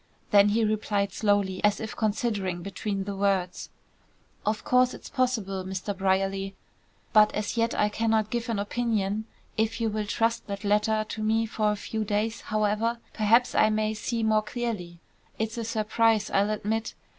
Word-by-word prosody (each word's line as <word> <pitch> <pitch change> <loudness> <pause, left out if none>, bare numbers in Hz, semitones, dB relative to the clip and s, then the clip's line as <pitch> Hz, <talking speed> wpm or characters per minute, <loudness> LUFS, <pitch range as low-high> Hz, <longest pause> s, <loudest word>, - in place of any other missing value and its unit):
Then 205 -1 +6
he 225 +2 +2
replied 205 -2 0
slowly 205 -3 +1
as 210 0 +3
if 220 - -5
considering 205 -5 -1
between 200 +1 -3
the 200 0 -5
words. 195 -2 0 0.8
"Of 215 +1 0
course 250 0 +3
it's - - -11
possible, 220 -8 0
Mr. 190 +2 -4
Brierly, 195 0 0 0.6
but 215 -1 +6
as 210 +2 -2
yet 230 0 +1
I 210 - +3
cannot 220 0 +1
give 235 0 -2
an 225 - 0
opinion. 215 -1 -1 0.3
If 225 +1 0
you 225 -1 +1
will 210 0 -2
trust 230 +2 0
that 200 0 -5
letter 210 +1 +2
to 215 - -5
me 220 +1 +2
for 215 -1 0
a - - -1
few 220 +1 -3
days, 215 +2 -1
however, 215 +2 0 0.2
perhaps 230 +3 +3
I 215 - +4
may 215 0 0
see 225 +2 -2
more 215 -1 +3
clearly. 215 -7 -4 0.4
It's 220 +1 -2
a - - -2
surprise, 220 -1 +1
I'll 200 +1 +2
admit. 215 +1 -2
215 Hz, 170 wpm, -27 LUFS, 200-225 Hz, 0.8 s, Then